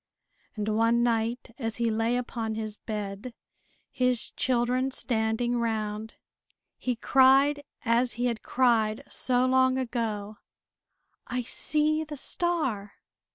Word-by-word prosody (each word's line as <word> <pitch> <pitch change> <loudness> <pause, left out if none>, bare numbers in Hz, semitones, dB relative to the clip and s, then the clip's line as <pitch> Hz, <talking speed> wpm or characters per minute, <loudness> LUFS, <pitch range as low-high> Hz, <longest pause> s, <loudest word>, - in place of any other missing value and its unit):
And 210 -1 -3
one 230 +2 +2
night 230 0 -1
as 225 -3 -3
he 235 -1 0
lay 225 +2 +1
upon 230 -3 -3
his 215 -1 -4
bed, 210 +2 -6 0.6
his 250 -2 0
children 255 +1 +1
standing 240 -1 0
round, 220 -1 -3 0.6
he 250 -1 -1
cried, 270 +4 +4 0.2
as 235 +2 +2
he 245 +1 -2
had 235 -3 -1
cried 225 -4 +1
so 250 0 +1
long 260 0 +3
ago: 220 -5 -3 0.9
"I 250 0 -2
see 305 +5 +1
the 300 -1 -7
star!" 260 - -1
235 Hz, 115 wpm, -27 LUFS, 220-255 Hz, 0.9 s, cried